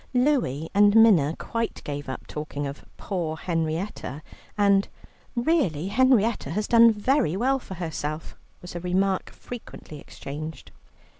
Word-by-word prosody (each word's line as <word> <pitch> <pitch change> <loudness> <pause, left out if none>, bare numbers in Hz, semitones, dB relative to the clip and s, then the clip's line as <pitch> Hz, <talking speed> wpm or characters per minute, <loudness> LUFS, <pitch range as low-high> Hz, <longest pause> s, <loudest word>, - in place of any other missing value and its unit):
Louie 245 - +1
and 205 +1 +5
Minna 185 -10 +6
quite 230 0 -3
gave 145 -1 -5
up 130 - -6
talking 150 -1 -5
of 140 +1 -6
"poor 170 -5 -3
Henrietta," 160 -3 -3 0.3
and 200 -1 +4 0.5
"Really 235 - +1
Henrietta 235 - +3
has 210 +7 -2
done 230 -1 +7
very 220 - +1
well 265 +5 +2
for 190 - -9
herself," 160 -2 -4 0.3
was 180 - -8
a - - -2
remark 185 +2 0
frequently 220 -10 -10
exchanged. 150 +1 -8
190 Hz, 130 wpm, -25 LUFS, 155-230 Hz, 0.5 s, done